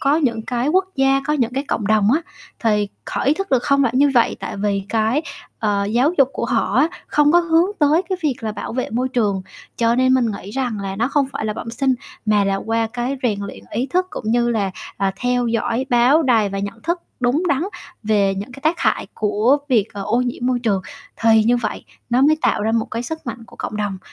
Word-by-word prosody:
có 280 +2 +3
những 235 -8 0
cái 245 +2 -1
quốc 375 +4 +3
gia, 270 0 +3
có 300 - +1
những 250 -5 0
cái 275 +2 -2
cộng 210 - -1
đồng 215 0 +3
á, 315 - +2 0.4
thì 210 -3 +1 0.2
họ - - -2
ý 285 +3 +4
thức 390 +3 -4
được 255 -2 +3
không 280 0 +3
phải 245 -3 +1
như 285 +1 +5
vậy, 235 - +3
tại - - -5
vì 200 -1 0
cái, 225 +6 +1 0.4
ờ, 205 -2 0
giáo 245 - +2
dục 270 -2 +5
của - - -3
họ - - 0
á 320 - +4 0.2
không 295 0 +3
có 345 - +6
hướng 335 +1 +3
tới 305 +4 +4
cái 375 - -2
việc 290 -5 +1
là 220 -2 -3
bảo - - -6
vệ 255 +2 -2
môi 250 +3 0
trường. 210 -7 0 0.3
Cho 230 0 +2
nên 255 +1 +3
mình 255 -2 +3
nghĩ 200 -1 -7
rằng 240 -3 -2
là 195 -1 -4
nó 235 +4 +1
không 280 -1 +1
phải - - -4
là 215 - -1
bẩm 230 - -6
sinh 260 +3 +1 0.3
mà 210 -1 +3
là 195 0 +1
qua 225 +3 -1
cái 250 +3 -2
rèn 215 -5 +1
luyện 200 -1 -8
ý 240 +5 -1
thức 365 +6 0
cũng - - -7
như 240 0 +2
là, 205 -4 0 0.3
ờ, 195 -1 +1
theo 245 -1 0
dõi 235 +2 -1
báo 250 +6 +5
đài 230 -7 +3
và 195 - -4
nhận 200 +3 -5
thức 345 +1 -1 0.2
đúng 250 +7 +2
đắn 285 +2 +1 0.4
về 205 -2 +2
những 205 +6 -6
cái 275 - -11
tác 320 +3 +1
hại - - +1
của 215 +6 +2
việc, 225 -6 +3
ờ, 200 -1 -5
ô 235 +5 +1
nhiễm 245 0 -2
môi 255 -1 +1
trường 210 -6 0 0.4
thì 225 -1 +5
như 240 +2 +4
vậy 220 -3 -4 0.3
nó 245 +2 +3
mới 305 +3 +5
tạo 205 - +2
ra 220 - 0
một 225 -1 +1
cái 230 +2 -3
sức 320 +3 -6
mạnh 230 0 -6
của - - -16
cộng 210 - -5
đồng 205 -2 -2
240 Hz, 245 wpm, -20 LUFS, 215-275 Hz, 0.4 s, có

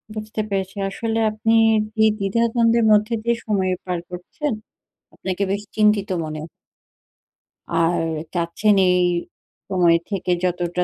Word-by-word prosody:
বুঝতে 215 0 -4
পেরেছি। 195 -1 -2
আসলে 225 +3 -2
আপনি 220 +1 0 0.4
যে 220 - +5
দ্বিধাদ্বন্দ্বের 230 +3 +2
মধ্যে 210 +2 +3
দিয়ে 235 0 +1
যে 235 - -12
সময় 190 -4 0
পার 180 -2 -2
করছেন, 180 - -4 0.6
আপনাকে 190 +1 -3
বেশ 200 +1 -1
চিন্তিত 210 -2 +3
মনে 155 0 -5 1.3
আর, 165 0 +2 0.3
চাচ্ছেন 175 +5 +1
এই 180 0 +3 0.7
সময় 175 -3 +4
থেকে 190 -3 -2
যতটা 180 0 0
200 Hz, 120 wpm, -21 LUFS, 180-220 Hz, 1.3 s, যে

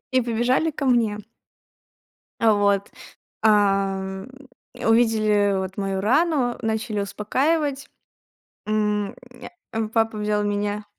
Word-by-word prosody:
и 260 - +4
побежали 245 +6 +1
ко 290 -2 -4
мне. 230 -4 +2 1.2
А 225 -2 +4
вот. 200 -1 +1 0.5
Ам, 195 -1 +1 0.4
э, - - -8
увидели 215 -3 +3
вот 190 +1 -4
мою 195 -1 -2
рану, 260 - +2
начали 220 -1 -2
успокаивать. 275 +8 -1 0.8
М, 210 -1 0 0.6
а, 220 -1 -2
папа 225 -1 0
взял 210 0 0
меня 205 0 -2
215 Hz, 105 wpm, -23 LUFS, 205-240 Hz, 1.2 s, и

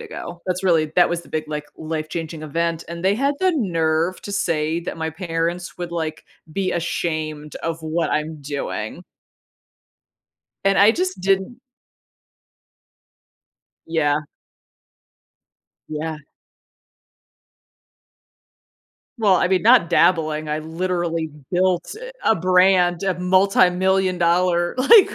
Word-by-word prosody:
ago, 175 0 -8
that's 185 +1 -2
really 160 -4 +2
that 180 - +6
was 175 0 -2
the - - -18
big, 155 0 -2
like, 150 -1 -4
life 155 -1 -4
changing 160 -1 -5
event, 165 +2 -2
and 170 +1 -7
they 195 +1 +4
had 280 +3 +1
the 370 -1 +3
nerve 165 - 0
to - - -7
say 165 -4 0
that 170 - -6
my 160 0 -3
parents 170 +1 -3
would, 175 -1 -5
like, 160 -2 -4 0.3
be 190 0 -1
ashamed 155 -3 -3
of 165 0 -4
what 160 +2 -1
I'm 155 0 -2
doing. 140 0 -5 1.6
And 195 0 +3
I 205 +2 +7
just 365 - -2
didn't 195 +6 0 2.3
Yeah. 150 -2 +1 1.7
Yeah. 155 0 -4 3.0
Well, 205 -4 +4
I 180 - +2
mean, 185 -1 +2
not 230 -6 +5
dabbling, 155 -3 +2
I 155 +1 -1
literally 165 0 -2 0.2
built 180 -1 +1 0.3
a 220 - +4
brand, 180 0 +3
a 190 -1 +1
multimillion 185 0 +3
dollar, 175 0 +2
like, 395 - +6
170 Hz, 115 wpm, -21 LUFS, 160-185 Hz, 3.0 s, I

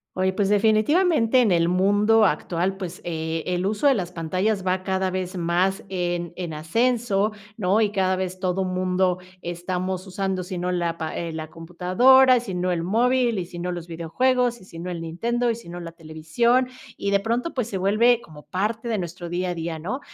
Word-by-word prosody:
Oye, 190 0 +1
pues, 195 0 0
definitivamente 230 - +3
en 215 -5 +3
el 170 -1 +3
mundo 205 +4 +4
actual, 180 +2 0
pues, 185 -2 -6
eh, 160 -1 -3
el 180 +1 -1
uso 210 +6 -2
de 280 - +7
las 180 -7 -3
pantallas 185 +4 -1
va 185 0 +1
cada 190 0 -1
vez 185 0 -3
más 180 +4 +1
en 175 -2 -2
en 175 -3 -5
ascenso, 220 +5 +1 0.3
¿no? 205 +1 +2
Y 210 -2 +2
cada 190 -2 +1
vez 185 0 -4
todo 185 0 0
mundo 185 0 0 0.2
estamos 180 +2 -3
usando 190 -1 -2
sino 180 -1 -3
la 170 -2 -1
pa 160 -1 -4
eh, 170 -1 -3
la 160 -1 -6
computadora, 185 +11 +4
y - - -1
sino 185 -5 -2
el 170 -2 0
móvil, 240 +4 +2
y 180 - -2
sino 175 +1 -5
los 175 -2 -5
videojuegos, 240 +9 0
y 185 - -16
sino 170 0 -7
el 170 -2 -4
Nintendo, 235 +9 -1
y - - -2
sino 175 -6 -9
la 170 -1 -7
televisión. 165 +10 0 0.3
Y 200 - -2
de 200 - +4
pronto, 235 +9 -2
pues, 250 -4 -1
se 195 - -3
vuelve 215 +6 +3
como 155 -6 -13
parte 215 +5 -2
de 225 -2 0
nuestro 175 -1 -5
día 180 +1 -1
a - - -4
día, 165 0 -4
¿no? 190 - -4
185 Hz, 195 wpm, -24 LUFS, 175-220 Hz, 0.3 s, de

